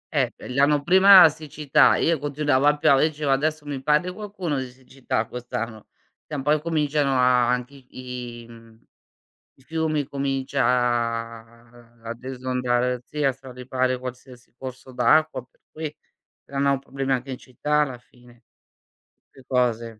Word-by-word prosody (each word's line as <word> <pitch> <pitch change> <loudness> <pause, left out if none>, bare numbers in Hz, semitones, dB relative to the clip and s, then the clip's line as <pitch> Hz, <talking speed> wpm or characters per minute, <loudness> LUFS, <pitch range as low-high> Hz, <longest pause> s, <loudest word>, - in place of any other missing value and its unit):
Eh - - +2
p - - -13
l'anno 145 +2 +2
prima 190 +3 +8
la 160 - +8
siccità, 150 -1 +2
io 165 -2 +1
continuava 145 -1 +1
a 150 - +1
piovere, 150 0 +4
dicevo: 150 -2 -2
"Adesso 150 +2 0
mi 140 -2 -5
parli 150 +6 +1
qualcuno 190 -7 -4
di 130 -1 -5
siccità 130 -3 -4
quest'anno". 115 -2 -6 0.4
Tra 150 - -5
un 135 - -4
po' 145 - +1
incominciano 150 -2 +1
a 125 -1 +3
anche 125 +2 -2
i 125 -3 -9
i - - -15
mhmm, 115 -1 -16 0.8
i 135 - -24
fiumi 155 0 -1
comincia 135 -1 -2
a 115 -1 -2
ad 115 +2 -7
esondare 125 -1 -1
sì, 150 +3 -5
a 135 -2 +3
straripare 130 0 -3
qualsiasi 125 -1 -10
corso 130 0 -9
d'acqua, 155 0 +2
per 125 - -38
cui, 155 -1 -6 0.5
creano 140 0 0
problemi 135 0 -4
anche 130 +1 -2
in 130 - -4
città 150 +4 -1
alla 130 -4 -4
fine. 120 0 -22 0.8
Ste 135 - -19
cose. 115 -3 -1
130 Hz, 150 wpm, -24 LUFS, 125-150 Hz, 0.8 s, prima